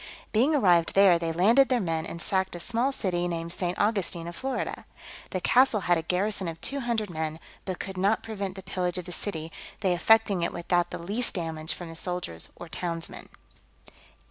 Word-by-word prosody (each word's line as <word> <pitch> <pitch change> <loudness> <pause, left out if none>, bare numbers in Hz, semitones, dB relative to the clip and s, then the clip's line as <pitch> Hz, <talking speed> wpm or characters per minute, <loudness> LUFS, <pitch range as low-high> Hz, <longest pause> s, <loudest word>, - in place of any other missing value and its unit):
Being 260 +8 +3
arrived 175 - +4
there, 195 -3 +6
they 165 -1 -1
landed 225 +11 +5
their 250 -2 +3
men, 165 -5 -1
and 170 - -6
sacked 190 +1 -1
a - - -5
small 235 +8 0
city 175 -8 -1
named 170 -1 -3
St. 180 -1 -2
Augustine 195 -5 0
of 170 - -6
Florida. 265 +3 -3 0.4
The 185 - -2
castle 245 -2 +4
had 175 -1 +3
a 165 - 0
garrison 185 +3 0
of 165 0 -5
two 280 +9 -2
hundred 230 -6 -1
men, 160 -1 -3 0.3
but 185 -2 -3
could 190 -1 -5
not 200 +4 +2
prevent 200 -4 -4
the 190 - -8
pillage 180 -1 -1
of 180 - -4
the 180 - -8
city, 165 -3 -3 0.3
they 190 -3 +3
effecting 205 +1 +4
it 170 - -1
without 175 0 +1
the - - -5
least 210 +9 -1
damage 160 -3 -3
from 175 - -7
the 165 - -9
soldiers 175 - -4
or 175 - -9
townsmen. 165 0 -3
180 Hz, 195 wpm, -27 LUFS, 170-210 Hz, 0.4 s, there